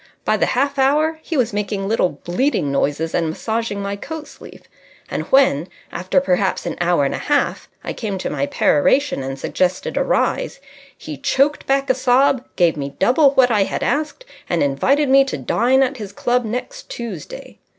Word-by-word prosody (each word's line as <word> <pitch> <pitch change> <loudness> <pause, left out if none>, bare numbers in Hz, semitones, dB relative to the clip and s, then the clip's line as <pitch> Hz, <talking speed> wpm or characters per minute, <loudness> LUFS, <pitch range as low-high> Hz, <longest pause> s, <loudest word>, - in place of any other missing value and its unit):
By - - +2
the - - +1
half 280 +2 0
hour 305 +4 +2
he 315 - -4
was 240 -4 +1
making 205 -1 -2
little 215 -4 +2
bleating 175 - 0
noises 145 +3 -1
and 165 -2 0
massaging 220 +3 -3
my 200 0 -3
coat 310 +8 -7
sleeve. - - -14 0.5
And - - -3
when, 185 - +4 0.2
after 185 +9 +1
perhaps 190 -6 0
an - - -3
hour 170 -4 +2
and - - -1
a - - -3
half, 290 -1 -1
I - - -4
came 205 -4 -4
to 185 - -4
my 140 -1 -1
peroration 260 - +2
and 135 0 -5
suggested 180 +6 -1
a - - +2
rise, - - 0 0.4
he - - -8
choked 285 +2 +1
back 275 0 +1
a - - +3
sob, 255 0 +2
gave 170 -4 +2
me 140 -1 -5
double 275 +2 +4
what 250 -2 +5
I 205 -3 +3
had - - -3
asked, 305 +11 -2 0.2
and 175 - +1
invited 265 - +2
me 270 +1 +6
to 270 - -4
dine 260 +3 +2
at 265 +1 -2
his 205 -4 -7
club 245 +3 0
next 250 - -5
Tuesday. 220 -10 -8
235 Hz, 185 wpm, -19 LUFS, 180-275 Hz, 0.5 s, me